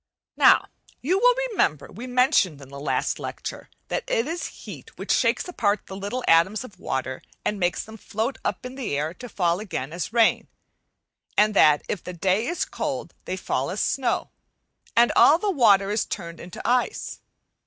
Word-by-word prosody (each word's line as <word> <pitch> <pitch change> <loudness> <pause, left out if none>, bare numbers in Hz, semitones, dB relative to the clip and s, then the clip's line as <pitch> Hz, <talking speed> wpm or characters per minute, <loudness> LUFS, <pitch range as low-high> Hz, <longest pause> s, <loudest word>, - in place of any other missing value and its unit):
Now - - +6 0.4
you 365 +8 +2
will - - +5 0.2
remember 155 - 0
we 235 +6 -8
mentioned 250 - +3
in 135 -2 -12
the 140 0 -9
last 145 - -1
lecture - - -6 0.2
that - - -1
it 230 - +1
is 335 +4 -3 0.2
heat - - -10
which - - -3
shakes - - +2
apart 210 - 0
the 190 - -8
little 205 +6 -4
atoms 190 +7 +4
of 200 -8 -13
water 130 -5 -3 0.2
and 210 - -1
makes 175 -1 0
them 220 0 -12
gloat 225 +6 -2
up - - -3
in 250 - -6
the 255 - -3
air 155 +3 -2
to 245 +6 -10
fall 175 -3 0
again 165 -9 -5
as 175 +3 -4
rain; 230 -1 +3 0.9
and 210 +1 +4
that 150 -6 +5
if 195 - -3
the 180 - -6
day 190 +6 +1
is 350 - -1
cold - - -4
they - - -3
fall - - -2
as - - -3
snow, - - 0 0.7
and 235 +1 +6
all 305 - +7
the 410 +3 0
water 205 - +4
is 210 - +1
turned 170 -3 -6
into 175 0 -7
ice. 250 - 0
210 Hz, 185 wpm, -24 LUFS, 175-250 Hz, 0.9 s, all